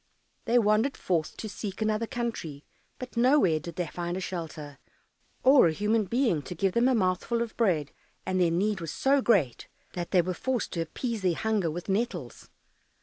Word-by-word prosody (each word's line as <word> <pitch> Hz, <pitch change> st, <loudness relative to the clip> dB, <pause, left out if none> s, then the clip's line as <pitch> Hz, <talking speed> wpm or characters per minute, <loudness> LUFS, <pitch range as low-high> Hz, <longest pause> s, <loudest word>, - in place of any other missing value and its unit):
They 240 Hz, +1 st, +3 dB
wandered 220 Hz, +4 st, +2 dB
forth 165 Hz, -4 st, -1 dB
to 220 Hz, -, -5 dB
seek 205 Hz, -1 st, -6 dB
another 215 Hz, +1 st, 0 dB
country, 220 Hz, -13 st, -4 dB, 0.3 s
but 255 Hz, -1 st, -8 dB
nowhere 235 Hz, -, +4 dB
did 170 Hz, +1 st, -8 dB
they 180 Hz, -, -1 dB
find 175 Hz, +2 st, -4 dB
a -, -, -2 dB
shelter, 155 Hz, -6 st, -6 dB, 0.6 s
or 265 Hz, -7 st, +7 dB
a 160 Hz, -, 0 dB
human 210 Hz, +4 st, +1 dB
being 230 Hz, -, +1 dB
to 180 Hz, -, -8 dB
give 190 Hz, +3 st, +1 dB
them 235 Hz, +2 st, +3 dB
a 260 Hz, -, +3 dB
mouthful 205 Hz, +4 st, 0 dB
of 230 Hz, -, -8 dB
bread, 170 Hz, -, +1 dB, 0.3 s
and 185 Hz, 0 st, 0 dB
their 175 Hz, -, +4 dB
need 190 Hz, +3 st, 0 dB
was 165 Hz, -, -5 dB
so 275 Hz, -, +2 dB
great 185 Hz, -, +1 dB, 0.3 s
that 175 Hz, -1 st, -4 dB
they 180 Hz, -3 st, +4 dB
were 185 Hz, +2 st, -2 dB
forced 255 Hz, +5 st, -2 dB
to 170 Hz, -, -1 dB
appease 225 Hz, +7 st, -4 dB
their 180 Hz, -3 st, +1 dB
hunger 215 Hz, -5 st, 0 dB
with 175 Hz, +3 st, -6 dB
nettles. 190 Hz, -, -3 dB
195 Hz, 190 wpm, -28 LUFS, 170-235 Hz, 0.6 s, or